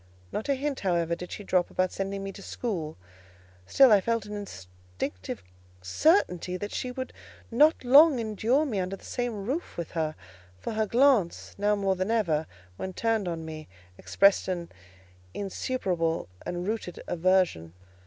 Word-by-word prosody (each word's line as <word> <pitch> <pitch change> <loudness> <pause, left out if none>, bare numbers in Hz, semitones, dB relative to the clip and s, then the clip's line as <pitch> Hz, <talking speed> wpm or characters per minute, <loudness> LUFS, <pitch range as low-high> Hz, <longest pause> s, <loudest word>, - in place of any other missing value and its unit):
Not 220 - -4
a 280 - +3
hint, 280 0 -2
however, 170 -3 0
did 180 +1 -8
she 205 - -6
drop 180 -2 +1
about 185 0 0
sending 195 0 -3
me 195 - -4
to 195 - -11
school: 180 -10 -4 0.7
still 270 -3 +6
I 205 -2 +6
felt 230 0 -1
an 210 - -7
instinctive 90 - -7 0.4
certainty 180 - +2
that 205 +3 -5
she 250 - -3
would 260 +1 -5 0.4
not 300 +7 +4
long 280 +3 +7
endure 230 +6 +1
me 220 -9 -2
under 185 +1 -2
the - - -16
same 235 -5 -3
roof 285 +10 -3
with 170 -2 -4
her; 155 -2 -1 0.4
for 95 - -5
her 215 0 0
glance, 240 -7 +3
now 205 +1 +3
more 195 -2 +1
than 185 +2 -2
ever, 170 -9 +1 0.3
when 190 - -5
turned 225 -1 0
on 165 -2 -4
me, 155 -1 -8 0.3
expressed 200 - +3
an 175 -2 -3 0.6
insuperable 185 - -1 0.2
and 175 +1 -3
rooted 215 -5 -4
aversion. 175 - +1
195 Hz, 160 wpm, -28 LUFS, 170-230 Hz, 0.7 s, long